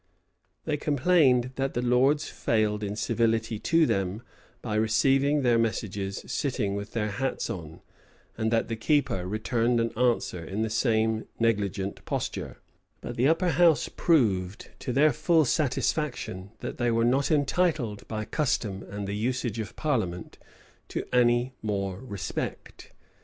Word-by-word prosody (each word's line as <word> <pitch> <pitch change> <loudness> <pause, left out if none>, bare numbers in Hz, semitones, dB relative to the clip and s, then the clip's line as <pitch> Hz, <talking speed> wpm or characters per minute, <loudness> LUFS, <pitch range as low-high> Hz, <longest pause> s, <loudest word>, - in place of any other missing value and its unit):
They 150 -2 0
complained, 140 -4 +3
that 135 0 -1
the 120 - 0
lords 130 +5 +3
failed 105 -2 0
in 100 0 -3
civility 115 -1 0
to 165 +5 +3
them, 100 -1 -1 0.4
by 110 - -3
receiving 135 +7 +2
their 120 -2 +4
messages 100 -3 -2
sitting 125 -8 -1
with 100 +1 -5
their 105 -2 -1
hats 130 +1 -2
on; 80 -7 -8 0.5
and 110 0 0
that 115 0 +1
the 115 - -3
keeper 115 - 0
returned 115 +3 0
an 115 0 0
answer 115 -7 0
in 100 +6 -3
the 110 - -2
same 110 -1 +1
negligent 100 -4 -1
posture: - - -4 0.4
but - - -6
the 125 +3 +3
upper 165 +3 +2
house 165 0 +4
proved, 105 - +1
to - - -3
their 145 +3 +4
full 165 +3 +3
satisfaction, 125 -7 -1
that - - -6
they 120 -1 +2
were 115 0 +2
not 135 +3 +2
entitled, 145 - 0
by 110 -1 -4
custom 110 -10 -1
and 100 0 -5
the 100 - -3
usage 120 0 -2
of 110 - -5
parliament, 105 - -2 0.5
to - - -4
any 120 +1 +3
more 100 -3 -2
respect. 110 -6 -6
115 Hz, 145 wpm, -27 LUFS, 105-135 Hz, 0.5 s, their